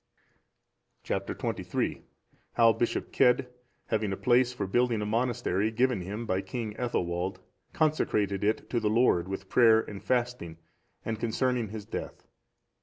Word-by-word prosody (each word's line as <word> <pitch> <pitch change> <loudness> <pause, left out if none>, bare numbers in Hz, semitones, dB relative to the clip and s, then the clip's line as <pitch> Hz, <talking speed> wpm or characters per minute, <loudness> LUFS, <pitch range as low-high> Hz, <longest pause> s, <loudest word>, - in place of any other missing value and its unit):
Chap. - - -2
XXIII. - - -2 0.5
How 115 -1 +5
Bishop 115 +2 -2
Cedd, 125 +1 +4 0.4
having 110 -2 -1
a 95 - -2
place 125 0 +3
for 125 -5 -3
building 120 +3 +1
a 105 - -2
monastery 110 -3 0
given 120 -1 +1
him 105 +6 -5
by 95 -3 0
King 115 -2 -5
Ethelwald, 90 -6 -2 0.3
consecrated 105 -11 +1
it 105 +2 0
to 120 - +1
the 110 -2 0
Lord 110 -6 +3
with 95 0 -5
prayer 115 0 +5
and 100 -2 -9
fasting; 120 -10 -1 0.5
and 110 -1 -3
concerning 120 +1 0
his 105 0 -7
death. - - -6
110 Hz, 140 wpm, -29 LUFS, 100-125 Hz, 0.5 s, How